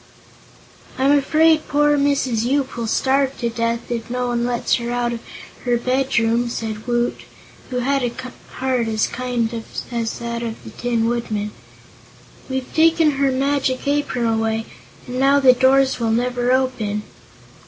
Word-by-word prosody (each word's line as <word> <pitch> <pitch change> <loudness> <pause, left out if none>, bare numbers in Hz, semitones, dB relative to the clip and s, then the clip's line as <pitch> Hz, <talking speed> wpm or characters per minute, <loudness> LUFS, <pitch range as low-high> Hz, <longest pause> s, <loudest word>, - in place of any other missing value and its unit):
"I'm 265 +2 +3
afraid 310 +2 +3
poor 295 0 +3
Mrs. 280 -5 +1
Yoop 265 +2 0
will 235 -2 -3
starve 270 +3 +1
to 235 -1 -2
death, 230 +1 -2
if 230 -1 -3
no 250 0 -1
one 240 0 0
lets 240 -1 +1
her 235 -1 -4
out 240 0 -1
of 235 - -4 0.5
her 245 -1 +2
bedroom," 240 -2 +1
said 220 -1 -5
Woot, 240 0 0 0.5
who 250 - -3
had 275 +2 +1
a 245 -1 -1 0.4
heart 255 -3 0
as 215 -1 +1
kind 245 -2 -2 0.4
as 230 -2 -2
that 235 0 -4
of 230 -1 -5
the - - -10
Tin 235 -2 -1
Woodman. 220 -3 -2 1.0
"We've 265 -1 -4
taken 325 -1 +4
her 275 -1 +2
Magic 270 0 0
Apron 285 -4 0
away, 225 0 0 0.4
and 250 +1 -4
now 275 +1 +4
the 260 -2 +7
doors 265 +1 +3
will 230 -1 0
never 245 +2 +1
open." 235 -5 0
245 Hz, 155 wpm, -20 LUFS, 235-270 Hz, 1.0 s, the